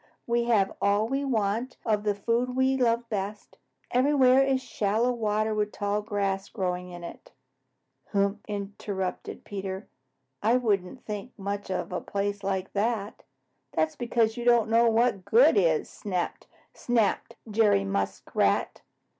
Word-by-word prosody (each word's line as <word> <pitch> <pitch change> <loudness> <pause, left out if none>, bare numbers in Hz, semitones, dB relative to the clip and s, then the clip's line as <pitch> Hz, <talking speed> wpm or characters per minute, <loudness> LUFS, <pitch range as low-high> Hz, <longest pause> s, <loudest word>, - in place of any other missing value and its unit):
We 235 0 +1
have 215 -5 +2
all 205 +2 +2
we 270 +3 -1
want 230 -1 -1
of 215 -2 +1
the 205 -1 +1
food 235 +5 0
we 260 +1 +3
love 235 -2 +1
best. 205 -1 -5 0.3
Everywhere 260 0 +5
is 270 -1 +2
shallow 225 0 0
water 215 -2 0
with 210 -1 -1
tall 205 +1 -1
grass 200 -2 -2
growing 180 -3 -3
in 175 -1 -9
it." 170 - -10 0.8
"Huh!" 200 -1 +2 0.2
interrupted 200 -2 -4
Peter, 195 0 -5 0.5
"I 230 +3 +4
wouldn't 210 -2 -1
think 210 +3 -6
much 200 0 -4
of 185 -1 -3
a 180 - -2
place 200 0 -3
like 190 -1 -2
that." 210 0 -1 0.5
"That's 160 0 0
because 235 -2 0
you 240 - -3
don't 235 -2 +4
know 230 +1 +5
what 230 -1 +3
is - - -17
good," 200 - +4
snapped 205 +3 -2 0.2
Jerry 205 - +3
Muskrat. 95 0 0
210 Hz, 140 wpm, -27 LUFS, 195-235 Hz, 0.8 s, Everywhere